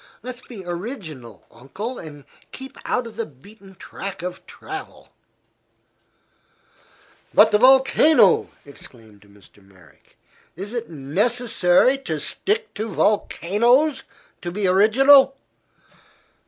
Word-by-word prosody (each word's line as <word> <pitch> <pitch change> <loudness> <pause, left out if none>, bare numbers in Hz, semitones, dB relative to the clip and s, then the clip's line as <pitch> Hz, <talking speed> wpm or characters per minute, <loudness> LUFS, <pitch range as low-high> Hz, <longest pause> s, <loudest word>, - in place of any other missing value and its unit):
Let's 250 0 -8
be 210 -8 -11
original, 170 - -8
Uncle, 190 - -7
and 145 -3 -11 0.3
keep 265 0 -10
out 250 - -1
of 225 -2 -11
the 230 - -2
beaten 195 +8 -18
track 195 -1 -8
of 180 0 -6
travel." - - -10 2.3
"But 220 +1 +6
the 210 - +3
volcano!" 270 - +4 0.2
exclaimed 115 -7 -15
Mr. 100 0 -21
Merrick. 90 -7 -23 0.4
"Is 195 +6 -8
it 235 -1 -5
necessary 200 - +1
to 160 - -4
stick 435 - -2
to 220 +2 -5
volcanoes 235 - +1 0.4
to 175 - -5
be 200 +2 -3
original?" 265 +9 +5
205 Hz, 105 wpm, -21 LUFS, 155-250 Hz, 2.3 s, But